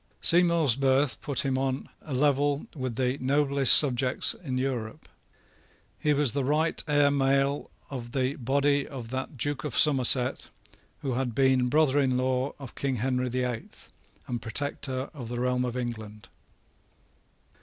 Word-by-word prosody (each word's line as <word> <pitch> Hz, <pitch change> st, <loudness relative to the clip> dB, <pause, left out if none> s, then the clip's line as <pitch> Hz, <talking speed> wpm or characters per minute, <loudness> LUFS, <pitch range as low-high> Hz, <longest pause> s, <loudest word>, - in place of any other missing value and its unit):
Seymour's 170 Hz, -6 st, +4 dB
birth 135 Hz, 0 st, +1 dB
put 140 Hz, -2 st, -1 dB
him 130 Hz, -1 st, 0 dB
on 135 Hz, 0 st, -2 dB
a 155 Hz, -, -11 dB
level 145 Hz, +1 st, +1 dB
with 130 Hz, -4 st, -4 dB
the 130 Hz, +2 st, -1 dB
noblest 140 Hz, 0 st, +3 dB
subjects 130 Hz, -3 st, +4 dB
in 130 Hz, -7 st, -5 dB
Europe. 125 Hz, -4 st, -4 dB, 0.9 s
He 150 Hz, -, +1 dB
was 145 Hz, -3 st, +3 dB
the 140 Hz, +4 st, -2 dB
right 155 Hz, +4 st, 0 dB
heir 145 Hz, -1 st, +3 dB
male 140 Hz, 0 st, 0 dB, 0.2 s
of 120 Hz, -3 st, -6 dB
the 130 Hz, 0 st, 0 dB
body 140 Hz, +2 st, +1 dB
of 125 Hz, -5 st, -8 dB
that 130 Hz, +1 st, -5 dB
Duke 145 Hz, +2 st, -2 dB
of 150 Hz, -5 st, -4 dB
Somerset 130 Hz, -3 st, +3 dB, 0.5 s
who 135 Hz, -3 st, -2 dB
had 125 Hz, -2 st, -2 dB
been 130 Hz, -2 st, +2 dB
brother 145 Hz, 0 st, +3 dB
in 130 Hz, -2 st, +1 dB
law 130 Hz, +1 st, -1 dB
of 135 Hz, -4 st, -10 dB
King 135 Hz, -2 st, -2 dB
Henry 125 Hz, +1 st, -1 dB
the 125 Hz, +1 st, -2 dB
Eighth, 120 Hz, -3 st, -7 dB, 0.3 s
and 120 Hz, -2 st, -4 dB
Protector 130 Hz, +3 st, -3 dB
of 130 Hz, -6 st, -8 dB
the 120 Hz, +1 st, -5 dB
realm 125 Hz, 0 st, 0 dB
of 125 Hz, 0 st, -3 dB
England. 110 Hz, -4 st, -6 dB
130 Hz, 155 wpm, -27 LUFS, 125-140 Hz, 0.9 s, Seymour's